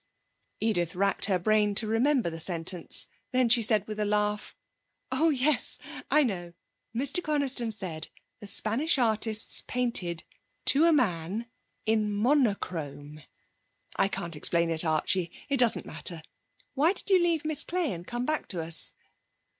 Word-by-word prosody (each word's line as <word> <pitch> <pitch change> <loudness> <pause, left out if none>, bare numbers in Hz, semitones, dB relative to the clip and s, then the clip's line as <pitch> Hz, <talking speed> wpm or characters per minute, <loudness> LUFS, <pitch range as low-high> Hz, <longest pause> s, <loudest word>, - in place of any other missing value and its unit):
Edith 175 -7 0
racked 195 +2 +3
her 195 -2 +2
brain 210 +2 +2
to 220 - +4
remember 230 - +1
the 165 - -7
sentence. 170 +1 -1 0.3
Then 255 -2 +3
she 235 0 +5
said, 215 -2 +3
with 215 -1 -6
a - - +1
laugh: 210 0 -1 0.6
'Oh 325 +1 +2
yes, 285 0 +1 0.3
I 300 - +4
know! 175 -8 -3 0.4
Mr 280 +8 0
Coniston 275 -6 -1
said: 185 -7 -4 0.3
"The 205 - -9
Spanish 240 +11 +1
artists 220 -2 0
painted 215 -10 -1 0.4
to 295 +4 +5
a 335 - +5
man 205 - 0 0.4
in 215 -1 +1
monochrome." 190 - -1 0.7
I - - +2
can't 170 -4 -4
explain 170 +2 +1
it, 160 0 +2
Archie. 165 +2 0 0.2
It 280 - +1
doesn't 240 -3 +4
matter. 160 +2 -3 0.5
Why 300 +6 +3
did 375 - -7
you 370 -2 +6
leave 335 -3 +1
Miss 310 -2 +5
Clay 350 - -1
and 175 0 -9
come 240 +1 -3
back 310 +2 -1
to 180 - -5
us?' 165 0 -2
215 Hz, 150 wpm, -28 LUFS, 175-260 Hz, 0.7 s, you